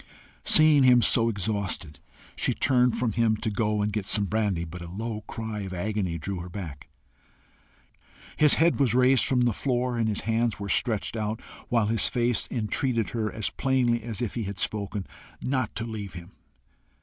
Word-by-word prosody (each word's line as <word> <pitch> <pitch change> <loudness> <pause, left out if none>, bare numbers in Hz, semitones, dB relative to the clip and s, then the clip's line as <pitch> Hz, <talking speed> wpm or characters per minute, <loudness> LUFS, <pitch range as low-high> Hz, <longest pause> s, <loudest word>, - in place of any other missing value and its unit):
Seeing 155 -2 +6
him 125 -2 +6
so 115 -1 +4
exhausted, 100 -8 -3 0.4
she - - 0
turned 125 -2 +2
from 120 -2 0
him 110 0 +1
to 110 0 -2
go 105 0 0
and 105 0 -2
get 100 -2 -3
some 105 - +1
brandy, 100 -4 -1
but 85 +2 -9
a 85 - -7
low 110 +3 -5
cry 110 -2 -5
of 95 -2 -5
agony 95 -2 -2
drew 95 +3 -4
her 90 +1 -7
back. 85 -7 -8 1.5
His 150 -2 +5
head 165 -1 +3
was 125 -4 +2
raised 130 -1 +4
from 125 -2 +2
the 120 -2 +2
floor 125 0 -1
and 110 -1 +1
his 105 - -2
hands 115 -1 0
were 100 -1 -5
stretched 115 -1 0
out, 110 0 -2 0.3
while 115 -3 +2
his 110 +1 +2
face 120 -1 0
entreated 115 0 -1
her, 110 -2 -2
as 110 - -2
plainly 125 -3 +1
as 115 +1 -5
if 115 - -3
he 115 -3 -3
had 100 0 -5
spoken, 100 0 -3 0.3
not 130 -4 -2
to 115 - -3
leave 105 -4 -6
him. 85 +1 -10
110 Hz, 185 wpm, -26 LUFS, 100-120 Hz, 1.5 s, Seeing